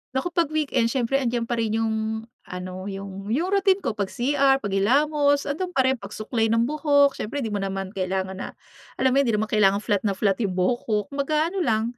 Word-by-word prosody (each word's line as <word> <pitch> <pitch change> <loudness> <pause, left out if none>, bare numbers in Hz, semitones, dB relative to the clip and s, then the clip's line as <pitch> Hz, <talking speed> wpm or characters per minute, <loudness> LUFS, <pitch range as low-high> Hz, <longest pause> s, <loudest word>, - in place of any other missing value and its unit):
Naku, 305 +7 -1
'pag 340 -1 +1
weekend 270 -6 +1
siyempre 260 +2 0
'andiyan 240 -3 -1
pa 230 0 -2
rin 220 -1 0
yung 225 -1 0 0.5
ano, 185 +1 -6
yung 195 0 -7
yung 315 - 0
routine 390 -1 +2
ko. - - 0
Pag-CR, 270 +6 +1
paghilamos, 285 +9 +2
ando'n 355 +5 -4
pa 265 - +4
rin. 260 -1 +1
Pagsuklay 220 +3 -2
ng 230 +1 +2
buhok, 285 +1 +3
siyempre 280 +6 -3
'di 220 - -3
mo 205 - -1
naman 195 -1 -3
kailangan 190 -1 -2
na - - -4 0.5
alam 260 0 +2
mo, 270 - +3
hindi 240 -6 +2
naman 215 0 -2
kailangan 205 -1 +3
flat 205 -1 0
na 200 - 0
flat 195 +1 +1
yung 200 -5 -1
buhok 185 +7 +1
ko. 215 - +1 0.2
Kumbaga 305 +4 0
ano 390 - -3
lang, 220 -9 +1
230 Hz, 205 wpm, -24 LUFS, 200-280 Hz, 0.5 s, pa